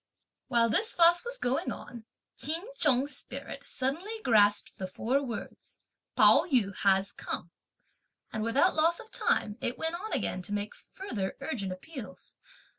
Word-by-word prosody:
While 235 -3 +3
this 430 - +2
fuss 345 +1 +6
was 485 +1 -3
going 255 - -1
on, 235 -2 -9 0.3
Ch'in 325 +6 -2
Chung's 285 - +2
spirit - - -5
suddenly 310 +12 -2
grasped 205 -3 +3
the 190 - -3
four 245 +9 0
words, 240 -4 -8 0.4
"Pao - - +6
yü 225 - +2
has 195 0 +2
come," 170 - -6 0.8
and 220 - -2
without 270 +11 +3
loss 330 +2 +3
of 450 -1 -12
time, 210 +3 0
it 245 - -2
went 320 +1 -1
on 390 +6 -5
again 185 - -1
to 205 +3 -7
make 205 0 -2
further 215 - -5
urgent 200 -11 -3
appeals. 185 - -9
250 Hz, 150 wpm, -29 LUFS, 205-330 Hz, 0.8 s, fuss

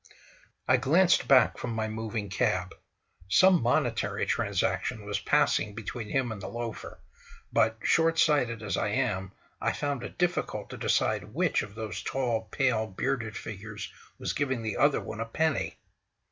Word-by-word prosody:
I - - +5
glanced 175 +6 +3
back 130 -4 +5
from 120 -2 -3
my 110 -1 -1
moving 110 -1 -4
cab. 90 -1 0 0.6
Some 185 - +6
monetary 120 +1 +1
transaction 105 -2 -1
was 100 -1 -2
passing 105 0 +2
between 115 0 -6
him 130 -4 0
and 105 -3 -6
the - - -5
loafer, 120 -2 -6 0.5
but, 110 +1 +3
short 165 0 +3
sighted 125 -9 +2
as 105 - -1
I - - 0
am, 95 0 -1 0.3
I - - +1
found 145 -3 -2
it - - -8
difficult 175 0 -1
to - - -7
decide - - 0
which - - +2
of 105 0 -8
those 110 -4 -5
tall, 120 -4 -1
pale, 115 -5 +1
bearded 115 +2 -2
figures 105 0 -7 0.2
was - - -3
giving 130 -5 -1
the 110 -2 -2
other 145 -1 +3
one 110 - -7
a 115 - -1
penny. 160 +6 0
115 Hz, 160 wpm, -28 LUFS, 105-135 Hz, 0.6 s, Some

